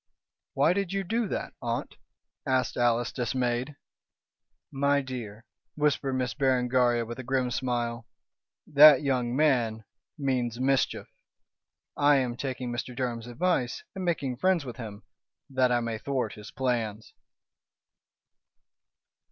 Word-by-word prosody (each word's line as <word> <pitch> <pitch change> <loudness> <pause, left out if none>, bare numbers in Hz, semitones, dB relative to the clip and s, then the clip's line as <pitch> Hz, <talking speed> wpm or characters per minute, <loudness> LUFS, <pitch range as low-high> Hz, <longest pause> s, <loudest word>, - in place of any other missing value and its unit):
"Why 145 +5 +4
did 195 -2 -2
you 195 0 -1
do 225 +4 -1
that, - - -4
aunt?" - - -3 0.5
asked 130 -2 0
Alice, 120 0 +2
dismayed. 125 +1 -1 1.0
"My 140 +1 +2
dear," 120 -5 -7 0.3
whispered 145 -2 +1
Miss 130 -1 -1
Berengaria, 125 -3 +2
with 120 +2 -7
a - - -5
grim 130 0 0
smile, 120 -2 -2 0.6
"that 145 -1 +8
young 125 -3 0
man 120 -7 +2 0.3
means 125 -5 -1
mischief. 135 +1 +1 0.9
I 145 0 +5
am 125 -3 0
taking 130 -1 -4
Mr. 120 +1 -4
Durham's 120 -2 -3
advice 130 -1 -1
and 190 -2 -5
making 140 -8 -1
friends 180 +1 +2
with 120 -3 -7
him, 105 -4 -8 0.5
that 130 -1 +2
I 120 -1 +2
may 115 -2 -3
thwart 130 -5 -2
his 105 0 -10
plans." 115 -5 -2
130 Hz, 125 wpm, -28 LUFS, 120-140 Hz, 1.0 s, that